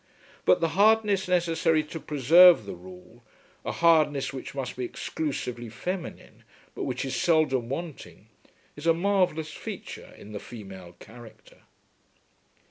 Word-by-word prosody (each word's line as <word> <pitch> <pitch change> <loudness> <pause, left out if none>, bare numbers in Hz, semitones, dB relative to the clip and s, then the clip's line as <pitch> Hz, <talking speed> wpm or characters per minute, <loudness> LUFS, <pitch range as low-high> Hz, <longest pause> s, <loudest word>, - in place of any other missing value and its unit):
But 90 - +4
the 165 - +2
hardness 205 +1 +3
necessary 165 -3 +2
to 155 +2 -8
preserve 155 - +6
the 100 - -6
rule, 90 +1 -14 0.4
a - - -3
hardness 155 -5 +2
which 135 +1 -8
must 135 -2 -4
be 125 - -4
exclusively 125 -3 -4
feminine 175 - -6 0.3
but - - -4
which - - -3
is 135 - -3
seldom 140 -8 +1
wanting, 160 +2 -7 0.5
is 150 +3 -6
a 165 - +5
marvellous 175 -4 0
feature - - -8
in 105 - -12
the 105 - -6
female 95 -7 -11
character. 120 0 -15
150 Hz, 130 wpm, -26 LUFS, 120-170 Hz, 0.5 s, preserve